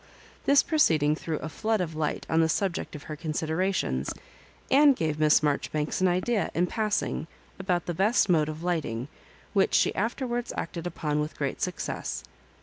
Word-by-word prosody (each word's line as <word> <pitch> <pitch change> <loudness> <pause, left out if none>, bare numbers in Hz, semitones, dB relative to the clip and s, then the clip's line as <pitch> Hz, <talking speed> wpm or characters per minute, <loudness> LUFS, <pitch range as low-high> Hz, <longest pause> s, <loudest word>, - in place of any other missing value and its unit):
This 280 0 +6
proceeding 155 - +3
threw 160 -1 -3
A - - -4
flood 220 +7 -1
of 170 -3 -2
light 155 -1 -2
on 160 0 +3
the 160 - +2
subject 180 -1 -1
of 150 - -8
her 155 - -6
considera 160 +4 -1
tions, 65 - -1 0.6
and 285 0 +7
gave 155 -6 -1
Miss 155 0 +5
Marjoribanks 150 +2 -1
an 185 - +5
idea, 185 +3 +1
in 175 - +3
passing, 210 -4 -1 0.3
about 180 -3 0
the 175 - -2
best 200 +8 +3
mode 155 -4 +3
of 155 +2 -6
lighting, 145 -8 -2 0.4
which 195 -2 +3
she - - +3
afterwards 240 +3 -2
acted 170 +1 -4
upon 150 -3 -2
with 150 +1 -3
great - - -3
success. - - -3
170 Hz, 170 wpm, -27 LUFS, 155-200 Hz, 0.6 s, and